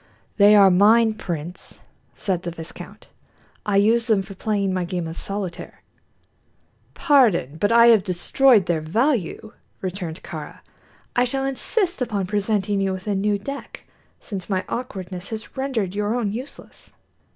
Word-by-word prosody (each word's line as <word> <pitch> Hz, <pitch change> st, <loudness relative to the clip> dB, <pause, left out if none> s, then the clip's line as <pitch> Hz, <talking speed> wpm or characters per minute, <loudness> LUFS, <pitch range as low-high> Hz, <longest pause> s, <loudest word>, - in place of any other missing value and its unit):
"They 205 Hz, 0 st, +7 dB
are 195 Hz, -2 st, +7 dB
mine, 220 Hz, +4 st, +5 dB
prince," 175 Hz, -3 st, -6 dB, 0.3 s
said 185 Hz, -4 st, -2 dB
the 175 Hz, -, -4 dB
viscount; 165 Hz, -1 st, -10 dB, 0.6 s
"I 205 Hz, -, +1 dB
use 225 Hz, +4 st, +3 dB
them 210 Hz, -4 st, +2 dB
for 195 Hz, +1 st, -10 dB
playing 200 Hz, -1 st, -1 dB
my 185 Hz, -1 st, -1 dB
game 175 Hz, -1 st, -3 dB
of 160 Hz, -, -7 dB
solitaire." 195 Hz, -3 st, -6 dB, 1.1 s
"Pardon, 240 Hz, -, +3 dB
but 205 Hz, +1 st, +1 dB
I 235 Hz, 0 st, +7 dB
have 225 Hz, -3 st, +6 dB
destroyed 200 Hz, +5 st, +3 dB
their 170 Hz, -3 st, 0 dB
value," 220 Hz, -, -1 dB, 0.3 s
returned 180 Hz, -3 st, -5 dB
Kāra. -, -, -8 dB, 0.5 s
"I 245 Hz, -, +4 dB
shall 270 Hz, +2 st, -2 dB
insist 345 Hz, -, -1 dB
upon 210 Hz, -6 st, -1 dB
presenting 205 Hz, 0 st, 0 dB
you 195 Hz, -1 st, 0 dB
with 190 Hz, 0 st, -7 dB
a 210 Hz, -, -1 dB
new 205 Hz, +1 st, +1 dB
deck, 275 Hz, +8 st, -8 dB, 0.3 s
since 195 Hz, -3 st, -7 dB
my 185 Hz, -2 st, -1 dB
awkwardness 190 Hz, -6 st, -5 dB
has 220 Hz, 0 st, -7 dB
rendered 255 Hz, -9 st, -2 dB
your 210 Hz, +2 st, -1 dB
own 225 Hz, -5 st, -1 dB
useless." 260 Hz, +5 st, -10 dB
205 Hz, 150 wpm, -22 LUFS, 185-230 Hz, 1.1 s, They